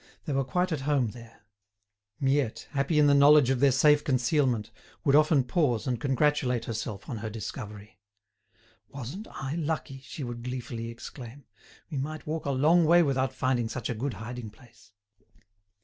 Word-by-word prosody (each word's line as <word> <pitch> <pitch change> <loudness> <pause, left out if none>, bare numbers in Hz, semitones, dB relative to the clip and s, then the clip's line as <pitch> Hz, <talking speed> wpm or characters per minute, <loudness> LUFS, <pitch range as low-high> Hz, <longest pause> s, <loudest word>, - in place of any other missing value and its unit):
They 150 - -2
were 135 0 +1
quite 180 +7 -1
at 155 -4 -2
home 135 -6 +2
there. 115 -1 -13 0.8
Miette, 135 -5 0
happy 140 +2 0
in 150 - +6
the 145 - +5
knowledge 140 -1 +6
of 130 - 0
their 140 0 +5
safe 145 +3 +4
concealment, 125 -4 +1 0.3
would 140 -1 +4
often 155 -2 +4
pause 125 -4 0
and 125 -3 -2
congratulate 135 -3 +1
herself 110 -2 -5
on 120 - -4
her 110 +1 -5
discovery. 105 -2 -8 0.9
"Wasn't 140 - -7
I 135 +1 -5
lucky!" 155 -4 -3
she 140 +2 -8
would 120 -1 -6
gleefully 120 -2 -5
exclaim. 120 +2 -10 0.5
"We 145 - -2
might 155 +3 -5
walk 155 -1 -3
a - - +1
long 155 +6 +4
way 170 +2 +6
without 135 -3 0
finding 130 -3 0
such 125 0 -4
a - - -1
good 120 +1 -3
hiding 110 +2 -7
place." 115 +1 -20
130 Hz, 165 wpm, -28 LUFS, 120-145 Hz, 0.9 s, in